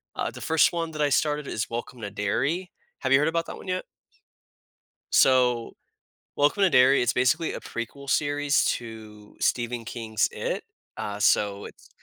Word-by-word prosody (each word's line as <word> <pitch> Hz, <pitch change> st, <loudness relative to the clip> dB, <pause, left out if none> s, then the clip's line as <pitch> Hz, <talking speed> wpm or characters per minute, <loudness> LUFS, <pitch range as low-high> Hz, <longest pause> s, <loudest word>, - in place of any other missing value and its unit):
Uh, -, -, -2 dB
the -, -, -10 dB
first 160 Hz, +1 st, +3 dB
one 165 Hz, -1 st, -2 dB
that 155 Hz, -1 st, -4 dB
I 145 Hz, -, +3 dB
started 150 Hz, +1 st, +1 dB
is 105 Hz, -, -3 dB
Welcome 120 Hz, +1 st, -6 dB
to 100 Hz, -, -4 dB
Derry, 135 Hz, -, -1 dB, 0.3 s
have 130 Hz, -, -1 dB
you 135 Hz, -, +7 dB
heard 150 Hz, -, +2 dB
about 165 Hz, +1 st, 0 dB
that -, -, -7 dB
one -, -, -12 dB
yet? 185 Hz, 0 st, -2 dB, 1.3 s
So, 125 Hz, -3 st, +3 dB, 0.6 s
Welcome 150 Hz, +8 st, +2 dB
to 190 Hz, -, +5 dB
Derry 130 Hz, 0 st, +5 dB
it's 120 Hz, -, +1 dB
basically 160 Hz, +7 st, +1 dB
a -, -, -5 dB
prequel 140 Hz, +4 st, -7 dB
series 145 Hz, 0 st, +2 dB
to 110 Hz, -3 st, -5 dB
Stephen 120 Hz, -1 st, 0 dB
King's 110 Hz, -3 st, -1 dB
IT, -, -, -3 dB, 0.4 s
uh, 105 Hz, 0 st, -4 dB
so 100 Hz, -1 st, +2 dB
it's -, -, -13 dB
130 Hz, 170 wpm, -26 LUFS, 115-150 Hz, 1.3 s, you